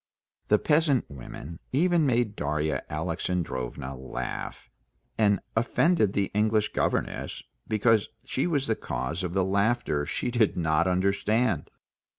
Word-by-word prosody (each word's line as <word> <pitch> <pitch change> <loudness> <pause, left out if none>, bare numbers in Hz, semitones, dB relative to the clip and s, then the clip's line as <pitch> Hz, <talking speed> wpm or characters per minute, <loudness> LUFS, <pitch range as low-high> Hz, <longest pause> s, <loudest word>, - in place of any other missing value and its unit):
The 105 - +5
peasant 150 0 +2
women 70 +4 -9
even 165 +2 +3
made 120 -4 +1
Darya 75 +1 -1
Alexandrovna 75 -5 -3
laugh, 65 -1 -5 0.5
and 100 -2 +3 0.2
offended 120 - +2
the 100 -1 0
English 105 0 +2
governess, - - -1 0.2
because 110 0 +3 0.2
she 135 +3 -1
was 145 -5 +1
the 110 - +1
cause 65 +6 -3
of 90 -2 -3
the 95 -1 +3
laughter 100 -6 +1
she 125 - -2
did 120 -4 +2
not 80 0 +2
understand. 100 +1 +1
100 Hz, 125 wpm, -27 LUFS, 80-120 Hz, 0.5 s, The